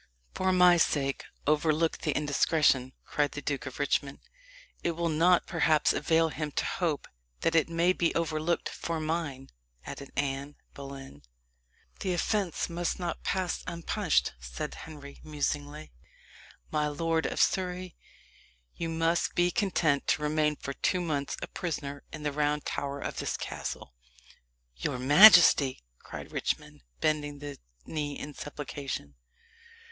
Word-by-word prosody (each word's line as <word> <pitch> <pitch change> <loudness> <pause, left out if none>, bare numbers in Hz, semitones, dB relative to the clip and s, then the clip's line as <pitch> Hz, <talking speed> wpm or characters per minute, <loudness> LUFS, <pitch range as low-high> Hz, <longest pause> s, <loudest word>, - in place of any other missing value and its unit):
"For 185 0 +1
my 180 -1 +6
sake 140 -4 +1 0.2
overlook 155 +2 +2
the - - -1
indiscretion," 145 -3 +2
cried 145 -1 0
the - - -4
Duke 140 -1 -2
of 130 - -7
Richmond. 140 -1 0 0.7
"It 170 - +1
will 170 +1 -1
not, 170 +3 +4
perhaps, 160 -2 +3
avail 160 +1 +2
him 150 -1 -3
to - - 0
hope 165 -5 -1 0.3
that 165 - +2
it 165 -1 +3
may 170 +2 +3
be 170 -2 +1
overlooked 165 0 0
for 165 -1 -4
mine," 155 -4 -3 0.3
added 140 - -7
Anne 140 +1 -2 0.2
Boleyn. 135 - -9 0.8
"The 185 - -1
offence 195 0 0
must 170 0 -2
not 175 -2 -4
pass 185 -2 -1
unpunished," 170 - 0
said - - -5
Henry 145 -3 -10
musingly. 150 0 -3 0.8
"My 150 -1 +1
lord 160 +2 0
of - - -4
Surrey, 180 -1 0 0.8
you 165 - -3
must 165 +1 +1
be 175 0 +3
content 175 -10 +1
to 150 - +1
remain 150 0 +2
for 140 - -6
two 180 +6 0
months 145 -5 -2
a - - -3
prisoner 145 -5 -4
in 155 - -7
the 150 - 0
Round 150 0 0
Tower 140 0 -3
of - - -4
this - - -2
castle." - - -5 0.8
"Your 60 - -2
majesty!" 145 - +7 0.2
cried - - -9
Richmond, - - -3 0.2
bending 145 -1 0
the 145 0 -8 0.3
knee 145 -2 -3
in 150 - -7
supplication. 140 - -6
155 Hz, 140 wpm, -29 LUFS, 145-170 Hz, 0.8 s, majesty